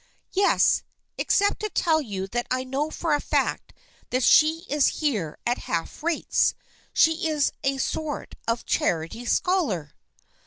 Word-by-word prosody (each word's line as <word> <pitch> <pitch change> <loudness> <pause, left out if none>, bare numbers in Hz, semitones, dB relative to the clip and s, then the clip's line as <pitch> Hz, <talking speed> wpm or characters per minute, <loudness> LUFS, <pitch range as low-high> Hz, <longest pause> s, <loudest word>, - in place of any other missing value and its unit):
" - - -50
Yes, - - +4 0.4
except 405 0 +2
to 430 - -3
tell 320 -5 +2
you 200 -8 -4
that 240 +3 -2
I 255 0 0
know 270 +4 -2
for 320 0 -1
a 290 - +1
fact - - -1 0.4
that 255 +1 0
she 315 +7 +5
is 295 -1 +3
here 215 - -1
at 240 +1 0
half 165 -1 -3
rates. 335 +1 +1 0.4
She 320 +1 +3
is 300 -2 +1
a 270 0 +1
sort 300 +2 -3
of 230 +1 0
a - - -20
charity 165 +9 -1
scholar." 240 - 0
280 Hz, 155 wpm, -25 LUFS, 230-315 Hz, 0.4 s, she